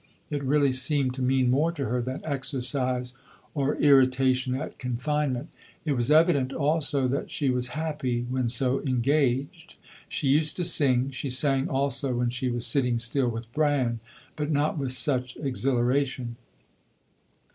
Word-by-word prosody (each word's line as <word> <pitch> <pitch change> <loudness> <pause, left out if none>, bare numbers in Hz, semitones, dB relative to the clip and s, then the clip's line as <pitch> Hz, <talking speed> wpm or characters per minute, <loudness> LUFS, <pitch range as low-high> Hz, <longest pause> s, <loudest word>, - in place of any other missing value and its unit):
It 145 -1 -2
really 140 0 +2
seemed 130 0 +3
to 130 - -6
mean 130 -1 +2
more 150 +6 +2
to 145 -5 -3
her 125 +2 -1
than 130 +2 -5
exercise 130 -3 -2 0.4
or 140 -1 0
irritation 130 -2 +3
at 135 - -6
confinement. 130 +2 -2 0.4
It 155 - 0
was 120 -2 -1
evident 150 -4 +4
also 145 -3 0
that 140 +3 -2
she 140 -4 0
was 125 0 -1
happy 150 -6 -2
when 125 -1 -1
so 130 +2 0
engaged. 140 +4 -1 0.3
She 145 - -2
used 150 +3 +2
to 180 - -2
sing. 135 -6 +4
She 135 +1 -4
sang 135 +1 +1
also 135 -1 -1
when 120 0 0
she 125 +1 -2
was 120 -1 -1
sitting 125 -4 +2
still 120 +2 +2
with 115 0 -7
Bran; 145 -6 +1 0.4
but 150 0 -3
not 150 0 +1
with 135 -4 -3
such 125 -1 -1
exhilaration. 130 -2 -1
135 Hz, 150 wpm, -26 LUFS, 125-145 Hz, 0.4 s, evident